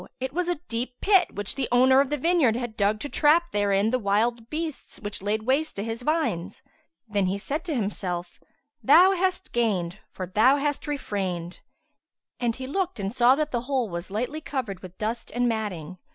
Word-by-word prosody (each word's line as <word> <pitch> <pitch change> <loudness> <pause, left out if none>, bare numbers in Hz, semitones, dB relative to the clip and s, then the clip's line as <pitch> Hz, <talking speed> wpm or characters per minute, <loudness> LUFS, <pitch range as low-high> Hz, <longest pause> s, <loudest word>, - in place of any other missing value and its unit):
it 260 +1 -4
was 355 +1 -1
a 350 - +1
deep 245 +2 -4
pit, 385 -3 +3
which 205 -1 -2
the 270 -2 -2
owner 260 +2 +6
of 280 - -1
the 295 - 0
vineyard 310 -6 +3
had 240 -2 -4
dug 210 0 +1
to 290 - -4
trap 320 +4 +3
therein 205 +1 +2
the 255 - +1
wild 225 +3 0
beasts 310 0 -5
which 205 -2 -5
laid 210 +2 -1
waste 275 +4 +1
his 225 +3 -3
vines. 245 - -1 0.4
Then 200 -3 0
he 190 +2 -1
said 290 +10 -3
to 320 -4 -2
himself, 185 -5 -3 0.4
"Thou 350 +7 +7
hast 370 0 -1
gained, 205 -6 0
for 185 - -5
that 180 - -19
thou 250 +6 +5
hast 290 0 -2
refrained!"; 190 - -3 0.8
and 235 -2 0
he 260 - -6
looked 360 - -2
and 195 +1 -2
saw 250 +1 +5
that 300 +1 -1
the 240 - -1
hole 255 -5 0
was 170 +1 -5
lightly 245 +10 -3
covered 240 -11 -4
with 185 -1 -12
dust 225 +2 -3
and 245 0 +2
matting. 185 -7 -3
240 Hz, 195 wpm, -26 LUFS, 200-290 Hz, 0.8 s, Thou